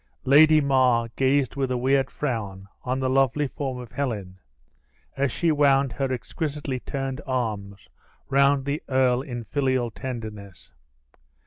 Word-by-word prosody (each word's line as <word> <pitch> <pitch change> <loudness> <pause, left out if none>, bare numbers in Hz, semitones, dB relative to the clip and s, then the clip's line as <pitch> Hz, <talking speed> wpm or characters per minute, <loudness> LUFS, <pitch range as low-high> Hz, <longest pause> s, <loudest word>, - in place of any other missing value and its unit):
Lady 155 +3 +7
Mar 130 -4 +2
gazed 135 -1 +1
with 135 -2 -1
a 125 - 0
weird 135 +1 +2
frown 105 -9 -4 0.2
on 130 +1 -1
the 130 - 0
lovely 135 +2 +2
form 135 -1 -4
of 125 -3 -9
Helen, 105 -9 -4 0.8
as 140 -1 0
she 170 +5 +1
wound 140 -3 +3
her 135 +3 -2
exquisitely 140 +2 -4
turned 135 +1 -4
arms 105 -7 -3 0.4
round 140 0 +3
the 140 +2 -2
earl 130 -1 +2
in 120 -3 -6
filial 130 0 0
tenderness. 110 -6 -8
130 Hz, 135 wpm, -25 LUFS, 120-140 Hz, 0.8 s, Lady